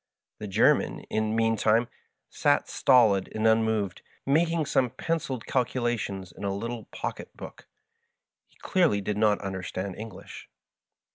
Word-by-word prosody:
The 105 - -5
Gennan, 95 - +2
in 110 0 0
the 110 - -1
mean 115 0 +2
time, 110 +2 +2 0.4
sat - - +1
stolid 110 -8 +4
and 110 0 -1
unmoved, 110 -4 +1 0.2
making 160 +3 +2
some 130 -2 +1
pen 165 +8 -1
ciled 130 -6 -6
calculations 120 -7 -1
in - - -10
a 100 - 0
little 115 +2 -5
pocket - - -7
book. - - -11 0.8
He - - -30
clearly 170 - +2
did 105 +1 -2
not 105 -2 +3
understand 95 0 -4
English. 110 +1 -10
110 Hz, 140 wpm, -27 LUFS, 100-125 Hz, 0.8 s, stolid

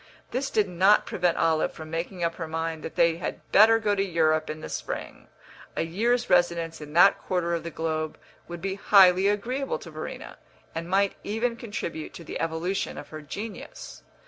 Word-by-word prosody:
This 270 +2 -1
did 210 -2 +2
not 190 +4 +4
prevent 175 -2 0
Olive 160 -1 +2
from 155 -1 -9
making 175 +2 -3
up 170 0 +1
her 165 - -4
mind 160 0 -3
that 160 - -7
they 165 -1 +3
had 170 - -6
better 220 +3 +7
go 215 -2 +1
to 200 - +1
Europe 155 -4 +1
in 155 0 -5
the - - -6
spring; - - -6 0.5
a - - 0
year's 235 +9 0
residence 170 -2 +1
in 150 0 -9
that 175 +4 +6
quarter 175 -2 -1
of 170 - -1
the 170 - -5
globe 155 -1 -3 0.3
would 175 0 -8
be 195 0 -1
highly 195 -1 +6
agreeable 250 - -1
to - - -11
Verena, - - -7 0.3
and 165 +1 -5
might 195 +1 +2
even 230 +3 -1
contribute 195 -9 -6
to 170 - -9
the - - -6
evolution 165 +4 -2
of - - -9
her 155 0 -8
genius. 205 +9 -8
175 Hz, 190 wpm, -26 LUFS, 165-205 Hz, 0.5 s, better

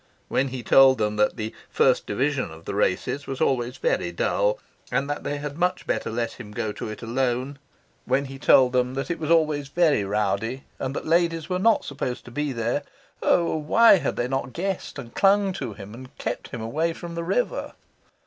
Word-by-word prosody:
When 135 - +1
he 130 -2 -6
told 135 +3 +6
them 105 -1 -1
that 105 0 +2
the 110 0 -4 0.2
"First - - +2
Division" 130 0 0
of 80 +1 -13
the - - -4
races 105 +8 0
was 135 - -4
always 125 -2 0
very - - 0
dull, - - +1 0.3
and 130 +3 0
that 145 0 -3
they 145 +1 -2
had 145 +2 -6
much 180 +1 0
better - - -1
let 115 +1 -2
him 105 -4 -9
go 105 0 -2
to 105 - -6
it 110 +2 -8
alone, 130 +3 -1 0.5
when 135 +2 +1
he 135 0 -9
told 130 -2 +5
them 125 0 +1
that 135 +5 -2
it 170 - -3
was 155 -1 -3
always 155 -4 +2
very 155 -6 +2
rowdy, 105 +5 -1 0.2
and 135 +1 -3
that - - -4
ladies 165 0 +1
were 180 0 0
not 225 +3 +3
supposed 130 -3 -4
to 120 - -11
be 150 +3 -2
there 120 +3 -1 0.4
oh, 170 -2 +2
why 195 +9 +6
had - - -2
they 120 - -1
not 135 -1 -3
guessed 190 -1 -3
and 120 -4 -8
clung 195 0 +3
to 190 - -5
him, 100 0 -10
and 130 +2 -12
kept - - -4
him 120 - -7
away 155 +9 -1
from 170 +1 -8
the 170 0 -3
river? - - -1
135 Hz, 205 wpm, -25 LUFS, 120-165 Hz, 0.5 s, told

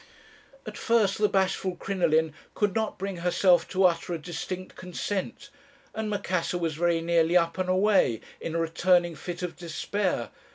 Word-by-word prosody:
At - - -7
first 220 -5 +2
the 210 -1 +3
bashful 190 -1 0
Crinoline 160 -5 +1 0.2
could 205 -2 +1
not 220 -1 -1
bring 195 -1 -4
herself 180 +1 +3
to 190 0 +1
utter 175 -1 +2
a - - -3
distinct 180 +3 -6
consent, 200 +8 -4 0.4
and 220 -1 -3
Macassar 185 -4 -1
was 165 -2 -1
very 170 +1 +1
nearly 170 +1 +3
up 170 +1 0
and 185 0 -1
away, 185 - +3 0.2
in 165 - -5
a - - +1
returning 175 +1 +2
fit 175 +4 -6
of 180 - -4
despair. 180 - -2
180 Hz, 160 wpm, -27 LUFS, 170-195 Hz, 0.4 s, the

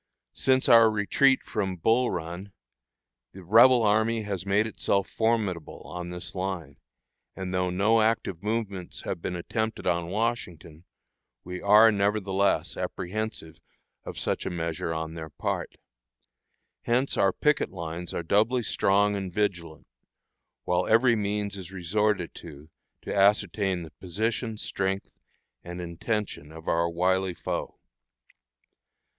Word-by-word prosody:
Since 130 0 +2
our 115 -1 +8
retreat 110 +6 +3
from 95 -4 -2
Bull 115 +8 +2
Run, 90 +3 -5 0.8
the 95 - -11
Rebel 115 +6 +6
army 110 +2 +2
has 100 -2 -4
made 100 +2 +3
itself 100 -3 0
formidable 110 -8 -1
on 90 0 -6
this 90 0 -5
line, 90 -7 -4 0.6
and 95 -1 -5
though 90 0 +1
no 105 +5 +3
active 110 -6 0
movements 105 -4 -3
have 85 - -4
been 90 - -3
attempted 110 +5 -3
on 85 -1 0
Washington, 90 -7 -3 0.6
we 90 0 -6
are, 105 +3 +7
nevertheless, 100 -1 +1
apprehensive 90 -4 -4 0.4
of - - -8
such - - -1
a - - -2
measure 80 -1 -3
on 80 0 -3
their 80 -1 -7
part. - - -3 1.1
Hence 125 +3 +1
our 95 - +3
picket 150 +9 +1
lines 85 -1 -6
are - - -3
doubly 110 +8 +2
strong 100 0 +2
and 95 -2 -4
vigilant, 90 -6 -2 0.8
while 90 0 0
every 115 +2 +5
means 105 -1 -2
is 95 -2 -8
resorted 95 0 0
to 80 -1 -12 0.3
to - - -4
ascertain 100 -2 +2
the 80 - -10
position, 110 - -3
strength, 95 -2 -3 0.5
and 90 +1 -7
intention 85 -2 -4
of 80 +1 -12
our 85 +1 +2
wily 90 +2 +1
foe. - - -4
95 Hz, 130 wpm, -27 LUFS, 85-110 Hz, 1.1 s, our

